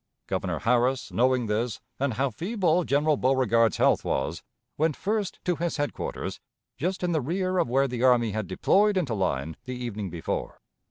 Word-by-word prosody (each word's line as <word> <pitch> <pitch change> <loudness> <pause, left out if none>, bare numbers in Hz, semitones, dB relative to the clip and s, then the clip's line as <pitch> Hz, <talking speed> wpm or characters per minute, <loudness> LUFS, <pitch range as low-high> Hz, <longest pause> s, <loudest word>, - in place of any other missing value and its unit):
Governor - - -2
Harris, 125 +2 +1
knowing 125 0 +2
this, 110 +2 -1 0.2
and 135 -4 0
how 135 +2 0
feeble 180 - +1
General 145 +1 +2
Beauregard's 115 -4 +3
health - - +3
was, - - -2 0.3
went 155 -1 +1
first 205 -1 -2
to 180 -3 +1
his 170 +2 -2
headquarters 145 -1 -3 0.4
just 185 +4 -2
in 175 - +1
the 160 -3 +1
rear 185 +6 -1
of - - +1
where 135 +2 +3
the 125 -2 -4
army 120 -3 +4
had 110 -1 -3
deployed 200 - +3
into 150 -11 0
line 80 -6 -1
the 130 -1 -4
evening 110 -5 -4
before. 85 -1 -4
130 Hz, 170 wpm, -27 LUFS, 115-170 Hz, 0.4 s, army